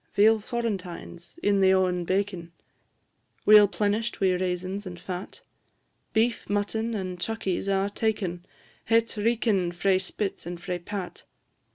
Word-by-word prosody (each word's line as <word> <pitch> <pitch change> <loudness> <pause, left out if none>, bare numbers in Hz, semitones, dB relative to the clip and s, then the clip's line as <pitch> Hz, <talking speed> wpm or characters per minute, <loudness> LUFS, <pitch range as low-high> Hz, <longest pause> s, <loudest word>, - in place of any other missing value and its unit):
Veal 220 +2 +5
florentines, 200 - -5
in 200 -1 +3
the 190 0 +5
o'en 180 -2 +1
baken, 185 -3 -1 1.0
Weel 210 -1 +9
plenish'd 215 +3 -1
wi' 190 -2 +3
raisins 185 +2 -2
and 175 -1 -8
fat; 180 +1 -7 0.7
Beef, 230 +2 +1
mutton, 220 +3 -1
and 185 -3 -4
chuckies, 200 -2 -2
a' 195 0 +2
taken 200 -6 -1 0.4
Het 230 0 +4
reekin' 210 -4 +1
frae 185 +2 +2
spit 190 -1 -4
and 175 0 -5
frae 180 -1 -4
pat. 190 +1 -6
195 Hz, 130 wpm, -27 LUFS, 180-215 Hz, 1.0 s, Weel